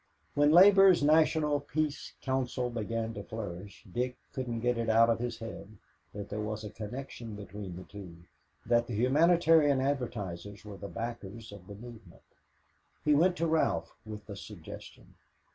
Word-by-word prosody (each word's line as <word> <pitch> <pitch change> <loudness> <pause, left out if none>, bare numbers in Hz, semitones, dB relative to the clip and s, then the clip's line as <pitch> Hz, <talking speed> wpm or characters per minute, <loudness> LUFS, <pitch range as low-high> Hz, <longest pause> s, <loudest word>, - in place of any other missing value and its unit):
When 145 +1 +4
Labor's 190 -1 +7
National 155 -1 +4
Peace 150 +1 -3
Council 130 -2 -1
began 115 0 -3
to 100 - -6
flourish, 100 -3 -7
Dick 125 +6 -3 0.2
couldn't 120 -3 -3
get 120 0 +1
it 115 -1 -1
out 115 +1 +5
of 115 - 0
his 120 -1 -3
head 110 -2 -9 0.3
that 100 -1 -7
there 105 +1 -3
was 110 0 -4
a 105 - -6
connection 115 0 -7
between 100 -2 -8
the 90 - -8
two, 95 -5 -10 0.5
that 120 0 +2
the 120 - -4
humanitarian 155 +3 +4
advertisers 105 -8 -3
were 105 -2 -8
the 100 - -7
backers 115 -1 -6
of 100 -3 -12
the 100 - -9
movement. 110 -5 -12 0.8
He 150 - +5
went 175 +5 +4
to 170 - 0
Ralph 155 - 0
with 105 -1 -8
the 100 - -8
suggestion. 95 -4 -11
115 Hz, 160 wpm, -31 LUFS, 105-140 Hz, 0.8 s, Labor's